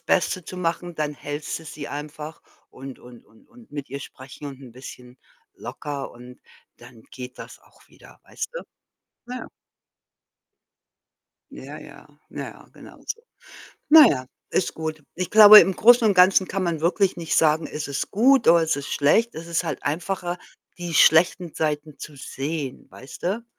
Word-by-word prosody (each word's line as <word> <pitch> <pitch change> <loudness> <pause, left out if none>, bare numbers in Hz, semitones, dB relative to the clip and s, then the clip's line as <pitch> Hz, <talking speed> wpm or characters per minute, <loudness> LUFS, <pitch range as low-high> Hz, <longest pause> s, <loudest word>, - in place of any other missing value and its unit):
Beste 180 -1 0
zu 185 - -9
machen, 175 0 -3
dann 150 -1 -3
hältst 145 +1 -5
du 160 - -14
sie 150 -1 -8
einfach 150 +2 -8 0.3
und 135 0 -10
und 125 -1 -15
und 110 - -25
und 245 -2 -19
mit 145 -2 -7
ihr 140 - -6
sprechen 130 +2 -11
und 135 -1 -9
'n 130 -4 -13
bisschen 125 0 -12 0.4
locker 145 -2 -7
und 125 +1 -14 0.4
dann 120 -1 -16
geht 125 -1 -10
das - - -10
auch - - -25
wieder, - - -19
weißt - - -6
du? - - -5 0.7
Ja. 255 - -6 2.1
Ja, - - -10
ja. - - -14 0.2
Ja, - - -9
genau - - -15
so. 460 - -5 0.7
Na 310 0 +10
ja, 130 - 0 0.2
ist 185 - -1
gut. 155 -1 -5
Ich 180 -1 -4
glaube, 215 0 +11
im 190 - +1
Großen 235 +3 +6
und 205 - +4
Ganzen 185 +1 +5
kann 195 +1 -3
man 170 -3 -2
wirklich 185 +3 +1
nicht 165 -2 -3
sagen, 155 0 +3
ist 150 -1 -6
es 140 - -4
gut 255 +4 +4
oder 170 0 +6
ist 160 - 0
es 140 0 -6
schlecht? 225 +12 +2
Es 165 +1 -8
ist 170 +1 -1
halt 165 - -4
einfacher, 175 +3 -3 0.4
die 175 -2 -6
schlechten 165 +2 +4
Seiten 150 -1 -3
zu 150 - -10
sehen, 140 +1 -5
weißt 130 -2 -13
du? 205 +6 -2
160 Hz, 170 wpm, -23 LUFS, 140-185 Hz, 2.1 s, glaube